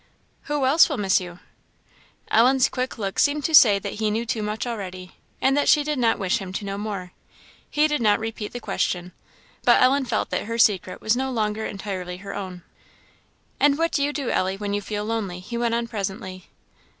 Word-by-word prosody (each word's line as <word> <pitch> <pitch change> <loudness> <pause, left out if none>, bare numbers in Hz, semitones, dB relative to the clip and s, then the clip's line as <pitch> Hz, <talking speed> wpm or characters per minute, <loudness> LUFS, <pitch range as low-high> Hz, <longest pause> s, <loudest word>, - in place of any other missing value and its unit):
"Who 295 -3 0
else 295 +7 +5
will 295 - -2
miss 195 -3 +2
you?" 175 -1 -8 0.9
Ellen's 255 +3 +4
quick 255 -1 -3
look 195 -3 -3
seemed 290 0 +2
to 320 - -1
say 215 -9 +8
that 195 - -5
he 215 -1 +1
knew 225 +3 -1
too 225 -1 -2
much 210 +2 -3
already, 185 -6 -6 0.2
and 270 +1 +2
that 290 - +2
she 295 - +5
did 300 -2 -2
not 230 -2 +2
wish 195 +3 0
him 190 -2 -7
to 200 - -4
know 200 0 -4
more. 200 -4 -5 0.6
He 300 +1 +3
did 300 -4 -1
not 210 -2 +3
repeat 225 -1 -5
the 245 - -6
question, 180 -5 -2 0.5
but - - +5
Ellen 270 +2 +3
felt 235 -3 -2
that - - -1
her 230 +2 -3
secret 195 -5 +2
was 220 +2 +2
no 265 +1 -1
longer 220 -3 -1
entirely 190 -3 -5
her 200 +1 -8
own. 185 -3 -6 1.0
"And 285 0 +4
what 330 +1 +1
do 285 - 0
you 285 +1 +1
do, 280 -4 -3
Ellie, 190 +1 0
when 205 0 -3
you 205 - -1
feel 210 0 -4
lonely?" 210 -5 -3
he 215 +6 -8
went 235 -1 0
on 235 0 -1
presently. 190 -4 -5
215 Hz, 210 wpm, -24 LUFS, 195-255 Hz, 1.0 s, say